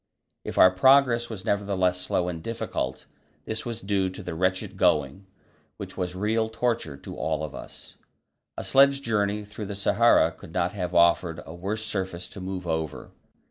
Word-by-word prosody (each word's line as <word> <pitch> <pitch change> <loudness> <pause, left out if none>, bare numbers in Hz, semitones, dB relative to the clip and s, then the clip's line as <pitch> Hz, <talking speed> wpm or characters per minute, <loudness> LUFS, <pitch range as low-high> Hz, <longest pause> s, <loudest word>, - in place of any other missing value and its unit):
If - - -6
our 95 - +8
progress 120 +3 +4
was 105 -3 -7
nevertheless 95 -4 +1
slow 90 -1 0
and 85 -2 -4
difficult, 80 - -4 0.4
this 110 +2 -3
was 115 -1 -5
due 95 -1 0
to 95 - -8
the 90 - -5
wretched 95 +3 -1
going, 75 +6 +1 0.5
which - - -8
was 90 0 -3
real 110 +3 0
torture 110 - -2
to - - -9
all 80 - -2
of 75 - -5
us. - - -10 0.6
A - - -4
sledge 140 0 +4
journey 105 -2 0
through 105 0 -7
the 100 - -5
Sahara 100 - +4
could - - -14
not 85 +2 0
have 90 -4 -4
offered 85 0 +3
a 80 - -9
worse 100 +5 -4
surface 95 -4 -3
to 95 - -9
move 95 -1 -5
over. 80 -5 -3
95 Hz, 175 wpm, -26 LUFS, 90-110 Hz, 0.6 s, our